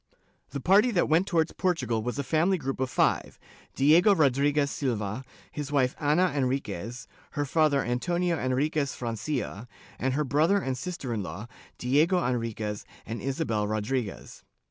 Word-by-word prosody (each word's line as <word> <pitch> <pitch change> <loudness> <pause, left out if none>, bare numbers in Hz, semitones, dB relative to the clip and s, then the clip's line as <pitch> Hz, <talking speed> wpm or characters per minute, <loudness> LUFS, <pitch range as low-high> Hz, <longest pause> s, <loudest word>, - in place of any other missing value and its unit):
The 140 - -4
party 200 - +5
that 190 -7 +1
went 165 +5 +3
towards 165 -3 +1
Portugal 130 - 0
was 125 +4 -3
a 140 - -1
family 165 +7 +2
group 135 -4 -4
of 130 -1 0
five - - +1 0.2
— - - -27
Diego 165 +9 +5
Rodriguez 140 -1 +2
Silva, 115 -3 -2 0.3
his 150 -1 -5
wife 130 -3 +2
Ana 155 +5 +3
Enriquez, 125 -4 -2 0.3
her 145 -1 -1
father 150 -1 +2
Antonio 170 +7 0
Enriquez 140 +2 0
Francia, 120 -1 -4 0.3
and 130 +1 0
her 150 - +1
brother 155 +8 +3
and 135 -9 -1
sister 135 -3 -4
in 110 - -2
law, 100 +2 -6 0.3
Diego 150 +9 +3
Enriquez 115 -4 -2 0.2
and 115 +2 -5
Isabel 130 -6 -1
Rodriguez. 110 +1 -3
135 Hz, 150 wpm, -27 LUFS, 120-155 Hz, 0.3 s, party